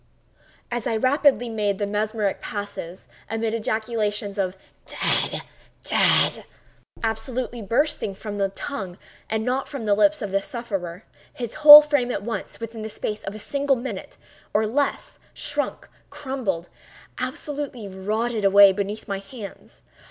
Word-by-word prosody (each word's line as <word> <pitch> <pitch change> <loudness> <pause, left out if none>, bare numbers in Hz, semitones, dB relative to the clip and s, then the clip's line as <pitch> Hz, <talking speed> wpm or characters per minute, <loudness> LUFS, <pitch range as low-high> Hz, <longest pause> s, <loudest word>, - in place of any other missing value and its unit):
As 240 -2 -2
I 225 - 0
rapidly 260 0 +3
made 210 -3 -1
the 205 - -1
mesmeric 210 0 -1
passes, 200 -4 -6 0.2
amid 225 0 -1
ejaculations 215 -2 -2
of 190 -1 -1 0.3
"dead! - - 0 0.4
dead!" - - +3 0.6
absolutely 240 +1 -3
bursting 240 0 0
from 205 +1 -6
the 195 -1 +1
tongue 195 -3 -6 0.3
and 220 0 -1
not 255 +2 0
from 275 -6 -6
the 205 - +3
lips 300 +6 +3
of 200 - -4
the 195 0 +1
sufferer, 195 -6 -5 0.3
his 240 -2 -5
whole 300 0 +13
frame 290 -5 +1
at 205 - -3
once—within 230 0 -5
the 220 - -5
space 210 0 -4
of 200 - -5
a - - -6
single 280 +5 0
minute, 255 +1 -6 0.4
or 215 - +4
even 215 +1 -3
less, 285 0 -1 0.2
shrunk—crumbled—absolutely 260 - -5
rotted 215 +4 -2
away 200 0 +8
beneath 200 +2 -4
my 200 -2 -2
hands. 200 +1 -11
220 Hz, 135 wpm, -24 LUFS, 200-250 Hz, 0.6 s, whole